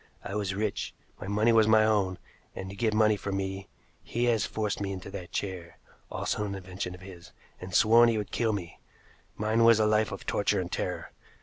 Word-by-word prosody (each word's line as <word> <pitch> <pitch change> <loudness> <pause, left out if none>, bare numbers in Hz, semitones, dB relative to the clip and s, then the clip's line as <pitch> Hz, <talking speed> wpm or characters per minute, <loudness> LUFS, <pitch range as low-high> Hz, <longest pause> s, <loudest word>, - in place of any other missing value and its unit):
I - - -6
was 100 -2 -2
rich, 105 0 -2 0.2
my - - -7
money 105 +3 +3
was 110 -1 +5
my 110 0 +5
own, 100 -4 +1 0.4
and 95 0 -6
to - - -9
get 110 +1 +1
money 110 0 +4
from 100 0 -3
me 95 0 -4 0.3
he 120 - -3
has 115 -4 +2
forced 105 -2 -2
me 100 -1 -2
into 95 0 -7
that 90 -2 -8
chair, 90 -4 -5 0.3
also 105 - -2
an 100 -1 -3
invention 90 -1 -6
of 90 - -15
his, 90 -3 -12 0.3
and 90 +1 -8
sworn 115 +2 +6
he 115 - +1
would 105 -2 -4
kill 115 -2 +1
me. 90 -5 -5 0.6
Mine 110 +2 +1
was 115 -1 +6
a 110 - +4
life 110 0 +2
of 100 - -7
torture 100 0 +1
and 90 -1 -4
terror. - - -3
100 Hz, 210 wpm, -28 LUFS, 95-110 Hz, 0.6 s, sworn